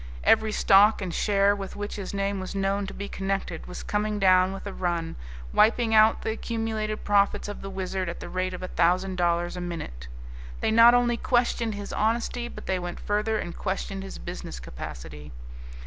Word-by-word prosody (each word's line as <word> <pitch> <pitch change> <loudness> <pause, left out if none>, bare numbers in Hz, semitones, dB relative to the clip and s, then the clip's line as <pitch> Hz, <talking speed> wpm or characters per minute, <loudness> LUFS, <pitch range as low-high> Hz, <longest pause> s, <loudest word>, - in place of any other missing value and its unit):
Every 220 - +4
stock 205 +1 +5
and 185 -3 -4
share 200 +1 +3
with 195 -1 -7
which 205 0 -5
his 195 -2 -5
name 200 0 -1
was 185 +1 -6
known 195 0 0
to - - -7
be 200 - -5
connected 195 -4 -3
was 180 - -7
coming 210 0 -1
down 185 -1 +4
with 195 +1 -7
a 200 - -5
run, 170 -2 -2 0.4
wiping 225 +1 +3
out 220 0 +5
the - - -1
accumulated 220 -1 -3
profits 200 0 +2
of 205 - -7
the 195 - -6
Wizard 190 -1 -3
at 170 - -6
the - - -7
rate 185 0 -2
of 180 - -8
a - - -3
thousand 185 +2 +1
dollars 175 0 +1
a 180 - -5
minute. 155 - -6 0.5
They - - 0
not 230 +2 +8
only 240 -1 +2
questioned 235 -3 +1
his 205 0 -6
honesty, 235 +2 0
but - - -10
they 190 -1 0
went 175 0 -6
further 210 +1 0
and 175 -4 -5
questioned 195 0 -3
his 195 - -8
business - - -7
capacity. 75 +4 -9
195 Hz, 195 wpm, -26 LUFS, 180-215 Hz, 0.5 s, not